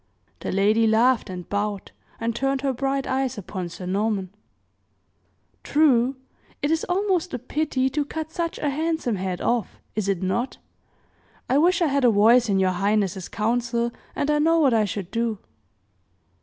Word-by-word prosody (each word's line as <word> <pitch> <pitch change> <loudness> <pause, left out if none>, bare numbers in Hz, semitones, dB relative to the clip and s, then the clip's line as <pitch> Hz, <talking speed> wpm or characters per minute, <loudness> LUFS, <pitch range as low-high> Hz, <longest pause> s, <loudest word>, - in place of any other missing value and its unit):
The - - -4
lady 210 +4 +3
laughed 230 +2 +3
and 180 -1 -7
bowed, 205 -1 -3 0.3
and 230 0 -2
turned 270 +1 0
her 275 -1 0
bright 275 +2 -1
eyes 265 -2 -1
upon 185 -2 -5
Sir 170 +2 -8
Norman. 195 0 -1 1.3
"True! 270 -4 +3 0.4
It 290 - 0
is 325 0 +1
almost 365 -2 0
a - - -1
pity 270 0 -1
to 295 +2 0
cut 315 +2 -6
such 335 -1 -3
a 290 - -1
handsome 315 -6 -1
head 185 -1 -3
off 235 -5 -1 0.2
is 210 -2 -1
it 195 -2 -1
not? 210 +8 -1 0.9
I 270 - +3
wish 345 +2 +3
I - - +4
had 280 -2 +1
a 245 - +6
voice 230 +3 +5
in 195 - +2
your 190 -1 +3
highness's 195 0 0
council, 235 +2 0 0.2
and 290 - 0
I 295 - +2
know 330 +2 +3
what 275 -6 +4
I 220 -2 +3
should 195 -2 -5
do." 230 -1 -1
235 Hz, 170 wpm, -24 LUFS, 205-285 Hz, 1.3 s, a